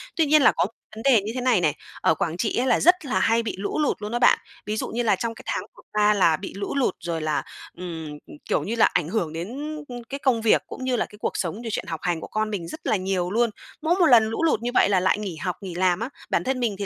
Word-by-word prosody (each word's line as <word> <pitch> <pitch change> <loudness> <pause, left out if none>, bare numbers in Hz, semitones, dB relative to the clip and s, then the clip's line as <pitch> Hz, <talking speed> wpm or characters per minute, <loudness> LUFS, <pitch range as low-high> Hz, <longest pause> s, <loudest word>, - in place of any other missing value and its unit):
Tuy 325 - +3
nhiên 300 0 +5
là - - +7
có 165 - +1
một 205 - -7 0.2
vấn 220 - -8
đề 250 -7 +5
như 210 - -4
thế 255 - -2
này 245 -7 +3
này, 155 -4 +2 0.3
ở 160 - +3
Quảng 165 +2 -2
Trị 215 - -1
á 250 - +2
là 250 -3 +3
rất 355 -2 +4
là 260 - 0
hay 230 +1 +3
bị 225 - -3
lũ 200 +9 -2
lụt 295 -7 0
luôn 210 +1 -4
đó 240 - -1
bạn. 245 - +6 0.3
Ví 215 +1 -2
dụ - - -2
như 240 +2 -2
là 210 -3 +3
trong 230 +4 -3
cái - - -12
tháng - - -1
vừa - - -14
qua 210 0 +4
là 170 -6 +3
bị 190 - -7
lũ 200 +5 -4
lụt 265 -9 +1
rồi 165 -2 -3
là, 155 -1 0 0.3
ừm, 165 -3 -6 0.2
ừ, - - -12 0.2
kiểu - - +1
như 225 - -2
là, 230 - +5
ảnh 170 -4 +1
hưởng 175 -6 -1
đến, 180 +10 -5 0.3
ư, 245 - -7
cái 275 +1 -4
công 255 -5 +2
việc 220 - +4
cũng 260 - -7
như 255 -1 +1
là 225 - 0
cái 210 - -15
cuộc - - 0
sống, 190 +6 -3
rồi 230 - -5
chuyện - - -2
học 160 -2 -4
hành 175 -2 0
của - - -7
con 215 0 -1
mình 190 -6 -4
rất - - -7
là - - +3
nhiều 185 -2 -1
luôn. 235 +2 +2 0.3
Mỗi 325 +3 +2
một 350 - +6
lần 240 -7 +7
lũ 225 - -2
lụt 305 -9 +2
như 245 - -2
vậy - - +4
là 195 -2 +4
lại 185 +2 +2
nghỉ 195 -5 -4
học, 180 +3 -3
nghỉ 185 -3 -6
làm 180 0 +2
á. 230 - -3 0.2
Bản - - +1
thân 260 0 -1
mình 230 -5 0
thì 200 - -2
215 Hz, 310 wpm, -24 LUFS, 180-245 Hz, 0.3 s, là